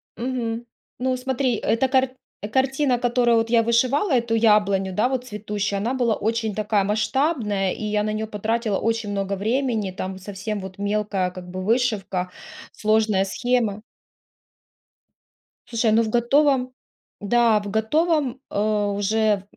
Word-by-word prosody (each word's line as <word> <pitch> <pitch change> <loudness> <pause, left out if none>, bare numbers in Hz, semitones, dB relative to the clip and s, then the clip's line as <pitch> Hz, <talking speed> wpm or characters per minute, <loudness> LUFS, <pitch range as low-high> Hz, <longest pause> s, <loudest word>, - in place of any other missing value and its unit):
Мгм. 235 -2 -3 0.3
Ну 255 0 0
смотри, 260 -1 0
эта 230 +5 +1
карт 260 0 +2 0.4
картина, 265 -1 +2
которую 240 -1 +2
вот 225 0 0
я 230 -1 +4
вышивала 255 - +2
эту 235 -2 +1
яблоню, 205 -4 +3
да, 215 +7 +2
вот 255 -2 -2
цветущую, 205 -3 -3
она 240 +6 -1
была 240 -3 +2
очень 220 0 -1
такая 210 -1 +1
масштабная 215 - 0
и - - -7
я 210 0 0
на 215 - -1
неё 215 +1 -3
потратила 215 0 -1
очень 225 -2 -1
много 200 -1 -2
времени. 220 -1 -1
Там 185 +1 -5
совсем 205 +2 -5
вот 190 0 -8
мелкая 200 -2 -1
как 180 -1 -10
бы 185 +1 -5
вышивка, 200 -5 0 0.4
сложная 215 -2 +2
схема. 225 0 0 1.8
Слушай, 230 -2 +1
ну 225 +2 +4
в 220 - -3
готовом, 255 +2 +2 0.5
да, 225 +1 +3
в 205 - -6
готовом, 275 - +1
а, 210 0 0
уже 205 0 +1
220 Hz, 140 wpm, -23 LUFS, 205-245 Hz, 1.8 s, я